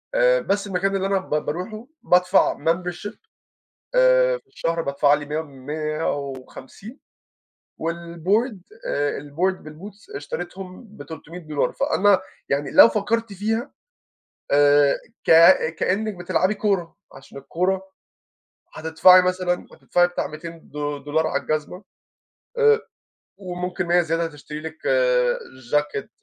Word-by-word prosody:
آآ - - +4
بس 200 +1 -1
المكان 195 +1 -1
اللي 195 0 0
أنا 195 0 +1
ب 190 - -13 0.2
باروحه 215 - -5 0.2
بادفع 180 +2 +3
membership 180 +4 -2 0.8
آآ - - +4
في 410 - -31
الشهر، 170 - -2
بادفع 140 0 +2
لي 145 0 -4
ميَّة 150 +2 -2
150، 145 - -6 0.8
و 165 +1 -2
الboard 175 +7 -1 0.3
آآ 145 0 -1
الboard 170 +7 -2
بالboots 205 - -11
اشتريتهم 195 - -7
ب300$، 160 -2 -4
فأنا 200 0 +2 0.3
يعني 140 0 -1
لو - - +8
فكرت 225 +1 -1
فيها 220 +6 -2 0.8
آآ 145 0 +5 0.3
ك - - +1 0.5
كأنِك 215 +3 0
بتلعبي 185 +2 0
كورة، 195 -5 -1 0.2
عشان 135 +1 -12
الكورة 185 +7 -1 0.9
هتدفعي 160 +3 +5
مثلًا 180 -1 -1
هتدفعي 175 0 +1
بتاع 175 - -3
200 165 +1 -10
دو 145 0 -4
دولار 150 +3 -1
على - - -1
الجزمة 155 +5 -3 0.8
آآ 445 -1 +5 0.6
وممكن 180 -1 -4
100 175 +1 +4
زيادة 165 0 -1
تشتري 150 -1 -9
لِك 160 - -8 1.0
چاكيت، 150 -2 0
175 Hz, 115 wpm, -22 LUFS, 155-200 Hz, 1.0 s, لو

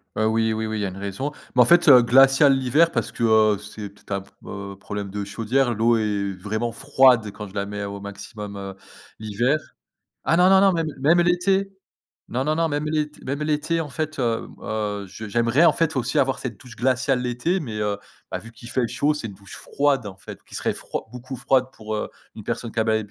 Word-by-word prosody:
Heu, 110 - +1
oui, 110 0 +2
oui, 110 0 -2
oui, 110 0 -3
il - - -2
y - - 0
a - - -2
une 95 - -10
raison. 100 +9 -4 0.2
Mais 125 - +6
en - - +7
fait, 175 +4 +5
heu, 130 -4 +9
glaciale 135 +3 +6
l'hiver 145 +6 +3
parce - - -2
que, 115 - -4
heu, 110 -2 +4
c'est 105 0 -8
peut-être 100 - -19
un 100 -1 -1
p - - -18 0.2
heu, 100 0 -7
problème 100 -1 -5
de 105 0 -3
chaudière. 120 +4 0
L'eau 115 +2 +3
est 100 -3 -1
vraiment 110 +5 -3
froide 130 -4 +3
quand 105 +1 -8
je 95 - -15
la 100 0 -2
mets 105 0 -5
au 100 0 -5
maximum, 100 0 -8
heu, 95 -1 -7 0.4
l'hiver. 120 +8 0 0.7
Ah 165 - +3
non, 180 +1 +6
non, 190 0 +6
non. 195 -1 +5
Même 165 -2 0
même 160 +6 +4
l'été. 190 +3 +1 0.6
Non, 130 +3 -1
non, 155 +1 +1
non. 165 0 +1
Même 145 0 -2
l'ét 150 -1 -1
même 140 +3 -3
l'été. 155 +2 0
En 155 - -4
fait, 155 +1 -4
hem, 115 -3 -1
heu, 105 -2 -3
je 110 +3 -8
j'aimerais 120 +8 +2
en - - +7
fait, 165 -3 0
aussi 125 0 0
avoir 135 0 +2
cette 120 -6 -6
douche 125 -2 -13
glaciale 130 +1 +1
l'été. 125 +10 0
Mais, 115 -7 -5
heu, 105 -1 0 0.3
bah - - -2
vu 115 0 -12
qu'il 115 +1 -12
fait 125 -1 0
chaud, 145 +5 +1
c'est 120 -7 -5
une 100 - -9
douche 100 +1 -12
froide 140 -5 0
en 95 -1 -8
fait, - - -11
qui - - -15
serait - - -1
froid - - -6
beaucoup 125 +1 -8
froide 135 0 +2
pour, 110 0 -6
heu, - - -4 0.2
une - - -10
personne 115 - -4
qu'a 110 -1 0
ba 110 -1 +2
120 Hz, 235 wpm, -23 LUFS, 105-145 Hz, 0.7 s, heu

